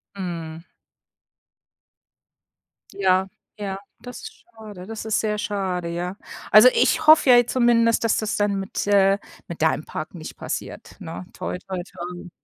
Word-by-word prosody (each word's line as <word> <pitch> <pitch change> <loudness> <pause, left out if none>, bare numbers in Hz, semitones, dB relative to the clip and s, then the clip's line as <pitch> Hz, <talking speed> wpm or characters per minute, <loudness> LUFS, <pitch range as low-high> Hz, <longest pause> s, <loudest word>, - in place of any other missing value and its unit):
Mhm. 165 -3 -6 2.3
Ja, 190 -1 +2 0.3
ja. 195 -2 -4 0.2
Das 245 0 -9
ist 445 - -11
schade 210 - -11
das 220 +1 -7
ist 220 -1 +1
sehr 210 -1 -1
schade, 190 -4 -2
ja. 175 +2 -4 0.4
Also, 215 +4 +9
ich 315 -1 +2
hoffe 310 -3 +7
ja 245 0 +7
zumindest, 235 -2 +3
dass 225 - +2
das 215 0 -2
dann 205 -1 +1
mit 195 +1 -4
äh, 195 -1 +4 0.3
mit - - -8
deinem - - +2
Park - - -6
nicht - - -9
passiert, - - -6
ne. 170 0 -8
Toi, - - -4
toi, 185 -2 -3
toi. 175 0 -9
200 Hz, 145 wpm, -23 LUFS, 180-225 Hz, 2.3 s, Also